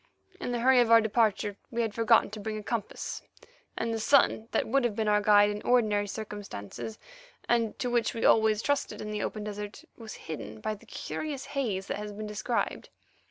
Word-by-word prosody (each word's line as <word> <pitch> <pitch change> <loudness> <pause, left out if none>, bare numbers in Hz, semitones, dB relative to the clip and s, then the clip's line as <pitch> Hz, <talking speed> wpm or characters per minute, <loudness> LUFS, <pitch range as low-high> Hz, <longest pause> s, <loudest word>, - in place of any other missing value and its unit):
In - - -3
the 240 -1 -1
hurry 260 +1 +6
of 240 -2 +4
our 230 0 +8
departure 215 -2 +1
we 235 0 -1
had 220 -2 -2
forgotten 225 -2 +4
to 215 - -7
bring 215 +1 -4
a 210 - -6
compass, 225 -1 -4 0.6
and 230 0 -1
the 225 - -2
sun, 225 -2 +3
that - - 0
would 275 +3 +2
have 235 -4 0
been 220 0 -1
our 210 0 +4
guide 205 0 +5
in 205 0 -5
ordinary 215 -4 +2
circumstances, 205 - -7 0.5
and 230 -2 +1
to 250 - -2
which 240 -1 +1
we 225 - -1
always 220 -1 +4
trusted 285 -1 -1
in 210 - -5
the 210 -1 -2
open 215 - -3
desert, 210 0 -6 0.2
was 220 -3 -8
hidden 110 -9 -6
by 215 - -2
the 205 - -14
curious 290 -3 -5
haze 215 -9 -1
that - - -3
has 210 0 -6
been 215 +1 -6
described. 210 +3 -2
215 Hz, 205 wpm, -29 LUFS, 205-235 Hz, 0.6 s, our